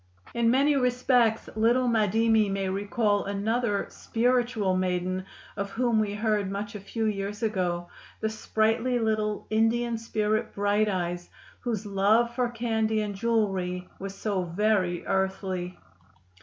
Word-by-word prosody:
In 235 -1 +2
many 280 +4 +4
respects 250 -3 +2
little 240 +3 +3
Madimi 220 -1 +3
may 195 0 -1
recall 205 +2 0
another 205 +2 0
"spiritual" 235 -5 +1
maiden 185 0 -1 0.3
of 200 0 -3
whom 230 +1 +1
we 205 -1 -1
heard 210 -2 0
much 205 +3 -4
a 210 - -6
few 220 +3 -3
years 205 +1 -2
ago, 180 -5 -1 0.3
the 220 - 0
sprightly 220 +3 0
little 215 -2 -1
Indian 230 +1 +1
spirit 215 -1 -1
"Bright 205 +1 +2
Eyes," 175 -2 -3 0.3
whose 225 -4 -3
love 210 +4 +2
for 250 -1 0
candy 225 -2 0
and 210 -1 -3
jewelry 195 -5 -1
was 195 0 -6
so 200 -2 -1
very 180 0 0
earthly. 190 -2 -2
215 Hz, 130 wpm, -27 LUFS, 195-230 Hz, 0.3 s, many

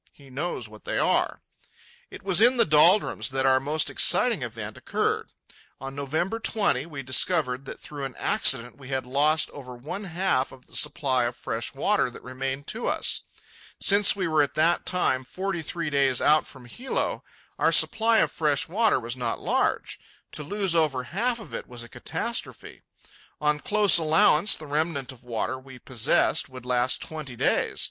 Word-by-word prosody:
He 140 -2 -18
knows 135 -3 -3
what 110 0 -15
they - - -3
are. - - +1 0.7
It - - -11
was 190 0 +2
in 245 +3 +5
the 230 - +5
doldrums 165 +6 +4
that 135 0 -1
our 130 0 +4
most 150 +3 0
exciting - - +3
event - - -6
occurred. - - -2 0.5
On 135 +1 -7
November 155 +10 -2
20, 200 - +1
we 140 -4 -7
discovered 130 -1 +1
that - - -8
through 145 -2 -8
an 135 - -7
accident 120 -1 +2
we 135 - -12
had 130 -2 -3
lost 150 +5 +1
over 125 -3 -10
one 160 +12 -7
half 175 -7 -1
of 130 -1 -15
the - - -12
supply 130 -6 +2
of 120 +1 -3
fresh - - -4
water - - +1
that - - -13
remained 135 +2 -5
to 225 - -3
us. - - 0 0.6
Since 200 0 +4
we 190 -3 -2
were 155 -2 +2
at 145 - -1
that 165 +3 +1
time 130 -8 0
forty 185 +5 -4
three 160 0 -4
days 135 -3 +2
out 155 +1 +3
from 130 -3 -11
Hilo, 250 - -3 0.4
our - - +3
supply 225 0 +4
of - - 0
fresh 150 -4 0
water 215 +6 +2
was 115 +1 -5
not 120 -3 -3
large. - - -1 0.3
To - - -6
lose 190 +3 -1
over 150 -6 +1
half 230 - -2
of 220 - -12
it - - -6
was 120 -1 -7
a - - -10
catastrophe. - - -5 0.6
On 150 0 +1
close 210 +1 +4
allowance, 160 +3 +4
the 155 - -10
remnant 145 -2 -2
of 130 -2 -15
water 125 +2 -3
we 130 -1 -13
possessed 125 -2 +1
would 130 -1 -11
last 125 0 +1
twenty 155 -6 -7
days. - - 0
145 Hz, 180 wpm, -25 LUFS, 130-175 Hz, 0.7 s, in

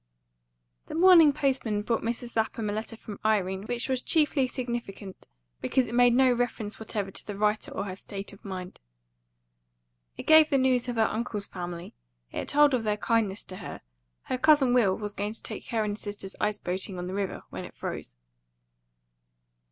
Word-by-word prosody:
THE - - -6
morning 335 -3 +8
postman 260 -7 0
brought 230 +2 0
Mrs. 235 +1 -4
Lapham 220 -1 -1
a - - -3
letter 220 +1 -5
from 210 -2 -9
Irene, 195 -2 +1
which 240 0 -2
was 260 -2 0
chiefly 295 -4 +2
significant 235 -6 -6 0.3
because 250 - +2
it 235 - -7
made 245 0 +5
no 260 -1 +5
reference 235 -3 -2
whatever 210 -3 -4
to - - -4
the 205 -2 -5
writer 210 +1 +1
or - - -3
her 185 -2 -5
state 195 +1 -7
of 200 - -16
mind. 185 -2 -7 1.4
It - - -7
gave 315 -1 +7
the 275 - +3
news 255 -2 +2
of 245 - -2
her 225 - +3
uncle's 215 -2 -2
family; 175 -1 -7 0.4
it - - -4
told 295 -1 +5
of 245 -3 +1
their 210 -1 0
kindness 220 -3 0
to 185 - -9
her; - - -8 0.4
her 255 - -3
cousin 290 -4 +5
Will 210 -7 +3
was 210 -1 -5
going 205 +2 -3
to - - -7
take - - -7
her 225 -2 0
and 205 -1 -2
his - - -7
sisters 205 -2 -6
ice 210 -1 +1
boating 185 0 -3
on 180 - -4
the 185 - -5
river, 195 -1 -3
when - - -6
it - - -11
froze. - - -6
220 Hz, 190 wpm, -28 LUFS, 200-250 Hz, 1.4 s, morning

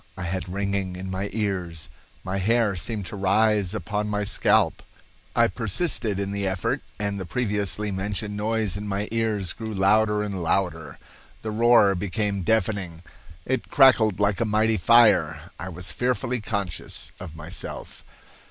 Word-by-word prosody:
I 95 - -5
had 90 +1 -3
ringing 100 -1 -2
in 95 +1 -6
my 95 +2 -3
ears. 90 -7 -3 0.4
My 95 +1 -2
hair 110 0 +2
seemed 100 +3 -3
to 90 - -5
rise 100 0 +2
upon 105 0 -2
my 105 0 -1
scalp. 100 -1 +2 0.5
I 120 - +5
persisted 115 - -1
in 100 0 -2
the 100 -1 -1
effort, 95 -1 -1 0.2
and 100 -1 -2
the 95 - -4
previously 105 -1 -1
mentioned 100 +2 -3
noise 110 -2 -1
in 105 +1 -5
my 100 +1 -2
ears 110 -6 -1
grew 110 -1 -6
louder 105 +2 +3
and 100 -3 -4
louder. 85 -2 -1 0.5
The 110 - -3
roar 115 -2 +5
became 100 +1 -1
deafening. 95 -5 0 0.4
It 130 0 -2
crackled 120 -8 +5
like 105 +1 +2
a - - +4
mighty 110 +1 +2
fire. 115 +2 +4
I 95 - -5
was 90 0 -5
fearfully 125 -1 -1
conscious 95 -7 -4
of 85 -4 -8
myself. 80 +4 -7
100 Hz, 150 wpm, -25 LUFS, 95-110 Hz, 0.5 s, I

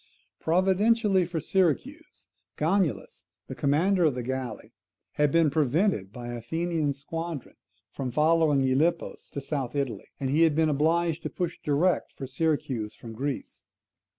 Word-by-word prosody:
Providentially 195 +3 +3
for 170 -2 -3
Syracuse, 195 - -1 0.3
Gongylus, 175 +2 -1 0.2
the - - -7
commander 175 +7 +2
of 145 -5 +2
the 125 - -3
galley, 130 0 -5 0.4
had 150 -1 +1
been 165 -2 +4
prevented 150 - +1
by 120 +1 -7
an 120 - -4
Athenian 160 +3 -1
squadron 165 +1 -6 0.4
from 135 -2 -4
following 155 0 +3
Gylippus 150 +6 0
to - - -5
South 135 -2 -3
Italy, 140 -4 -2
and 135 -1 -1
he 155 +3 +3
had 160 -3 +4
been 160 0 +3
obliged 165 +3 +1
to - - -4
push 180 -2 -3
direct 150 +5 +1
for 135 - -7
Syracuse 130 -5 -1
from 115 -1 -10
Greece. 135 +4 -5
155 Hz, 145 wpm, -27 LUFS, 135-170 Hz, 0.4 s, been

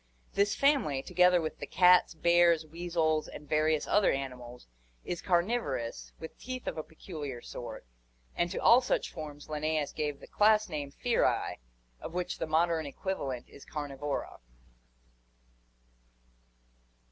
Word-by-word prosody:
This 200 0 +2
family, 265 - +2
together 180 0 +4
with 155 -1 -4
the - - -6
cats, 180 -2 +5
bears, 170 -1 +4
weasels, 160 -1 -1
and 150 - -10
various 155 0 +2
other 205 -1 +4
animals, 125 -3 -6 0.4
is 175 - -3
carniv 190 +7 +2
orous, 120 - -5
with 160 - -9
teeth 255 0 -6
of - - -3
a 155 - -3
peculiar 150 -6 -7
sort, 120 - -8 0.5
and 175 - +1
to 185 - -5
all 240 +2 +6
such 250 - -1
forms 150 -3 -8
Linnaeus 155 -1 -1
gave 145 -2 -3
the - - -11
class 215 0 +3
name 145 -3 -4
Ferae, 240 - 0 0.4
of 170 - -8
which 180 -1 -3
the 165 - -2
modern 160 0 +1
equivalent 140 -6 -4
is 140 - -14
Carnivora. 145 -1 -4
160 Hz, 135 wpm, -30 LUFS, 145-180 Hz, 0.5 s, all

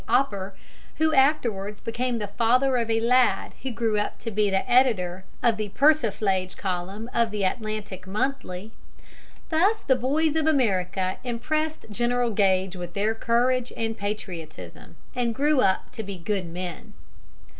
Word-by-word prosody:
Opper, 200 -7 +1 0.4
who 315 0 +2
afterwards 230 -8 +2
became 240 +1 -2
the 210 - -2
father 250 +5 +2
of 230 -1 -1
a 225 0 +2
lad 250 +2 +3
who 265 - -3
grew 225 -3 0
up 210 - -2
to 230 - -4
be 210 0 +2
editor 190 -3 +2 0.2
of 230 -2 +3
the 215 -1 -3
Persiflage 205 -8 +2
column 190 +4 -3
of 235 -1 +2
the 210 -2 -3
Atlantic 205 -2 -3
Monthly. 215 -3 -3 0.8
Thus 390 +7 +3
the 260 - +3
boys 290 +5 +1
of 315 -1 +1
America 190 - +1
impressed 305 +6 -2
General 240 +2 +1
Gage 190 -2 +2
with 175 -1 -7
their 210 +2 +1
courage 240 +2 +1
and 225 0 -1
patriotism 200 -6 -6 0.2
and 240 -2 -1
grew 290 +2 +3
up 190 -6 +1
to 225 - -5
be 200 -2 -6
good 185 +1 -2
men. 175 0 -7
225 Hz, 145 wpm, -25 LUFS, 195-255 Hz, 0.8 s, lad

